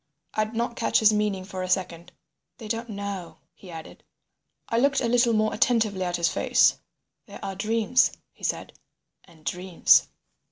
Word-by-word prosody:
I 215 - +1
did 220 +2 -10
not 235 +1 -2
catch 230 - +1
his 220 -1 +5
meaning 210 -3 -1
for 190 -1 -6
a 185 - -4
second. 175 -2 -2 0.5
"They 225 - -9
don't 230 +2 -3
know," 200 -6 -6 0.2
he 190 - -15
added. 160 -2 -10 0.6
I 230 - 0
looked 275 +2 +3
a 240 - 0
little 240 0 +3
more 215 0 +1
attentively 220 -5 +1
at 175 -1 -1
his 170 -1 +2
face. - - +3 0.5
"There - - -10
are 195 - -4
dreams," 225 +4 +2 0.2
he - - -23
said, - - -3 0.5
"and 160 -4 -21
dreams." 180 +4 +3
205 Hz, 170 wpm, -25 LUFS, 180-230 Hz, 0.6 s, his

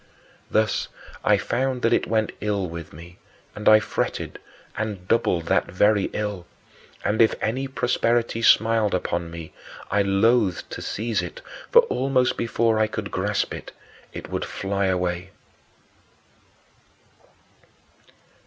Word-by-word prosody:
Thus 110 0 +1 0.4
I - - +4
found 130 0 -1
that 115 - +3
it - - +1
went 110 -1 +1
ill 100 -3 -1
with 85 -1 -8
me; 85 +3 -13 0.3
and 105 - +2
I 110 0 +8
fretted, 105 - -3 0.4
and 105 -5 -4
doubled 90 -7 +1
that - - +2
very 105 +2 +3
ill. 105 -4 -4 0.6
And 110 +2 +2
if 110 - +4
any 130 +5 -1
prosperity 120 -3 0
smiled 110 -2 +4
upon 85 -1 -2
me, 85 -1 -9 0.4
I 105 +1 +3
loathed 100 0 +2
to - - -6
seize 115 +1 -2
it, - - -7 0.3
for 480 0 +8
almost 135 - +1
before 115 -1 +1
I 110 - +3
could 105 -1 -5
grasp 100 +2 -1
it, - - -8 0.4
it - - -8
would - - -2
fly 100 0 -2
away. 90 0 -1
105 Hz, 130 wpm, -24 LUFS, 95-115 Hz, 0.6 s, I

